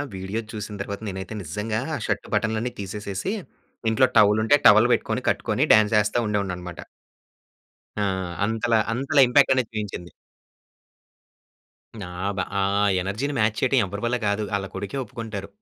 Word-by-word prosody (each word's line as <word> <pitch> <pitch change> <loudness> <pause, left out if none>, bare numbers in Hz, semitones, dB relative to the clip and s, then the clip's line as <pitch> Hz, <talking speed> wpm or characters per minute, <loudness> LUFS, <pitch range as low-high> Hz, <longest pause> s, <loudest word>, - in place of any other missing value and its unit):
Video 95 +4 -4
చూసిన 105 -1 -6
తర్వాత 100 0 -5
నేనైతే 95 +1 -6
నిజంగా 105 +6 -3 0.2
ఆ - - -2
షర్ట్ 100 -2 -2
బటన్‌లన్నీ 110 +3 -1
తీసేసేసి, 100 - -4 0.6
ఇంట్లో 120 +4 +4
టవల్ 105 0 +5
ఉంటే 145 - +5
టవల్ 110 +4 +7
పెట్టుకొని - - -1
కట్టుకొని - - 0
డాన్స్ 110 0 +4
వేస్తా 105 +3 0
ఉండేవాడినన్నమాట. 90 -4 -3 1.2
ఆ! - - +2 0.4
అంతల, 115 +1 -1 0.2
అంతలా 135 +4 +2
ఇంపాక్టనేది 130 -2 +3
చూయించింది. 100 -5 -5 1.9
నాబా 95 +2 -3 0.2
ఆ - - +2 0.4
ఎనర్జీ‌ని 110 +10 -3
మ్యాచ్ 110 0 +1
చేయటం 130 0 +3
ఎవరి 100 +2 -6
వల్ల 125 +1 +1
కాదు. 100 +1 0
ఆళ్ళ 100 -1 -2
కొడుకే 100 +6 -5
ఒప్పుకుంటారు. 110 -4 -6
105 Hz, 130 wpm, -24 LUFS, 100-115 Hz, 1.9 s, టవల్